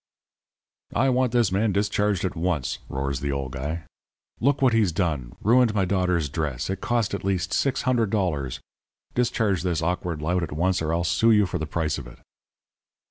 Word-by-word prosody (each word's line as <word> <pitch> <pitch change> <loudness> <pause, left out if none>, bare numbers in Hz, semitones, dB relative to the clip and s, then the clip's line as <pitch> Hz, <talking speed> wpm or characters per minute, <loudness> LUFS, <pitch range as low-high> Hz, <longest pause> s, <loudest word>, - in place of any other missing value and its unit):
"'I 135 +3 +3
want 130 -1 +2
this 120 -5 +2
man 105 +3 +2
discharged 100 -1 +1
at 90 - -2
once,' 80 -6 -1
roars 70 0 -2
the 70 +2 -2
old 70 -2 -3
guy. 75 +5 -4 0.6
'Look 140 +3 +2
what 130 -3 +4
he's 110 -5 +3
done. 75 -9 -2
Ruined 120 0 +4
my 95 -2 +2
daughter's 90 -4 +1
dress. 75 +1 -3
It 95 - -4
cost 120 -4 0
at 100 - -3
least 95 -1 -1
$600. 105 - 0 0.5
Discharge 110 -7 +1
this 85 -3 -1
awkward 85 -2 -1
lout 90 +3 +1
at 80 -3 -4
once 90 +4 +1
or 80 0 -1
I'll 85 +1 +1
sue 110 +6 +3
you 105 -2 +5
for 90 -1 -3
the 80 - -3
price 80 -2 -1
of 65 - -9
it.' - - -13
90 Hz, 180 wpm, -25 LUFS, 80-105 Hz, 0.6 s, you